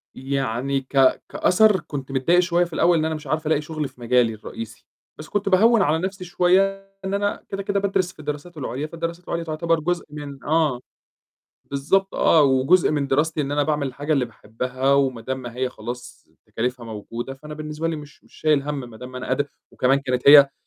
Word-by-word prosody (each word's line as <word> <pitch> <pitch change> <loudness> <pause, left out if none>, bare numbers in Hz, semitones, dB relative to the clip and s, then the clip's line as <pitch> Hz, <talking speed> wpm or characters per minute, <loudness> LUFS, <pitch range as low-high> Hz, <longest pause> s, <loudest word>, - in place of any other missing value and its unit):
يعني 135 0 -1
ك 135 0 +3
كأثر 210 +1 +4
كنت 135 -2 -7
متضايق 140 +7 +3
شوية 175 0 +2
في 170 - -12
الأول 170 +2 +3
إن 155 - +1
أنا 160 0 -1
مش 155 -1 -9
عارفة 155 +2 -1
ألاقي 155 -1 +2
شُغل 155 -1 -4
في 125 - -19
مجالي 120 -1 +3
الرئيسي، 110 +1 -9 0.3
بس 155 - -10
كنت 205 -1 -1
باهوّن 220 +4 +5
على 160 -1 +2
نَفْسي 190 +1 -4
شوية 195 +3 +1
إن 190 - -2
أنا 205 0 -1
كده، 195 0 -4
كده 200 0 0
بادرس 190 -2 0
في - - -26
الدراسات 150 +3 -6
العُليا 140 +1 -4
فالدراسات 170 +2 -5
العُليا 170 0 -2
تُعتبر 165 +1 0
جزء 175 +3 -1
من 145 -2 -8
آه. 150 -4 +1 0.9
بالضبط 190 +8 +1
آه 160 -2 +5
وجزء 140 +7 +4
من 145 -2 0
دراستي 150 +3 +1
إن 140 -1 -3
أنا 145 0 +2
باعمل 150 -2 0
الحاجة 145 +4 -2
اللي 135 -4 +2
باحبّها 125 +4 -2
وما 135 -4 +1
دام 130 +3 -3
ما 120 -2 -8
هي 130 0 -1
خلاص 120 +1 -8 0.2
تكاليفها 125 +1 -3
موجودة 115 +4 -6
فأنا 150 +3 -10
بالنسبة 155 +1 -4
لي 165 - -1
مش 150 -2 -12
مش - - -25
شايل 150 -3 +2
هَم 145 0 -3
ما 110 - -12
دام 125 +2 -9
أنا 125 - -5
قاد 145 0 0 0.2
وكمان 135 +2 +2
كانت 125 -2 -1
هي 140 -1 +9
150 Hz, 200 wpm, -23 LUFS, 130-170 Hz, 0.9 s, هي